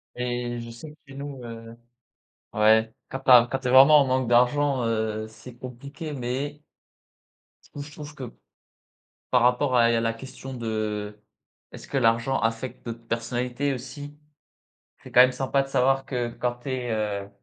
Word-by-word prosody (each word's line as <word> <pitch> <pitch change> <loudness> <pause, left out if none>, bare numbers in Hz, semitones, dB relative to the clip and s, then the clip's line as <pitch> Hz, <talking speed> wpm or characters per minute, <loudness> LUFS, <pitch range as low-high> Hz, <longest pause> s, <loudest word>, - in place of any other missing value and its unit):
Et 120 -1 -3
je 115 - -8
sais 135 +6 -10
que 150 - -19
chez 135 - -12
nous, 140 -2 -7
heu 115 0 -9 0.8
ouais, 110 +1 +4 0.2
quand 130 - -5
tu 130 - 0
as 120 -1 +9
quand 135 - -1
tu 130 -1 -4
es - - +1
vraiment 140 +3 +8
en 135 - +2
manque 130 -1 0
d'argent, 125 +2 +3
heu, 110 -1 -1
c'est 120 +2 -13
compliqué, 140 +6 -8
mais 140 +3 -4 1.0
je - - -22
trouve 145 0 -8
je - - -14
trouve 150 0 -10
que 125 -4 -8 1.0
par 125 -2 +4
rapport 125 +1 +2
à 115 -1 +5
il - - +2
y - - +2
a - - +1
la 115 0 0
question 130 +2 -9
de 105 -3 -3 0.5
est-ce - - -11
que - - -1
l'argent 115 +4 +2
affecte 115 +2 -3
notre 115 0 -7
personnalité, 125 +4 -2
aussi? 145 +4 -9 0.9
C'est - - -12
quand 125 - +7
même 130 0 +4
sympa 135 +1 0
de 135 - -8
savoir 135 +1 +2
que 120 -3 -2
quand 120 0 -3
tu 135 - -6
es, 125 -3 -2
heu, 105 -2 -2
125 Hz, 185 wpm, -25 LUFS, 115-135 Hz, 1.0 s, as